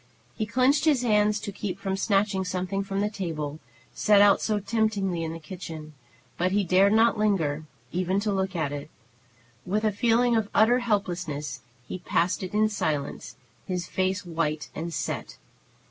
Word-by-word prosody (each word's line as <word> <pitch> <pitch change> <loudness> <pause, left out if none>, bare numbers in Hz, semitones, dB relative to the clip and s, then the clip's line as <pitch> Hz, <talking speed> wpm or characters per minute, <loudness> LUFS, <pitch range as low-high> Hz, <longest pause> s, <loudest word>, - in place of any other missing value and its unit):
He 215 -2 -3
clenched 260 +7 +3
his 285 -6 +3
hands 210 -2 +3
to 200 - -4
keep 195 -2 -4
from 195 -1 -2
snatching 195 -1 +1
something 185 +2 -2
from 195 0 -2
the 210 - +1
table, 155 -7 -4 0.3
set 210 -1 +4
out 200 -1 +6
so 215 -2 0
temptingly 200 -5 0
in 160 - -3
the 165 - -6
kitchen, 160 -2 -8 0.5
but 180 +1 +2
he 205 +1 +2
dared 190 +3 +4
not 225 0 +4
linger 160 -8 +1 0.3
even 185 +2 0
to 210 0 0
look 190 -1 -1
at 155 -4 -1
it. 145 +1 -6 0.7
With 205 +4 -1
a 215 - +3
feeling 235 +3 +3
of 220 -2 0
utter 235 +4 +5
helplessness 175 - -2 0.3
he 185 - -5
passed 175 +1 0
it 185 +2 -5
in 215 +1 +4
silence, 155 -9 -3 0.3
his 180 -2 -2
face 190 +1 -1
white 160 -3 -2
and 165 +2 -4
set. 60 - -4
195 Hz, 170 wpm, -26 LUFS, 170-210 Hz, 0.7 s, out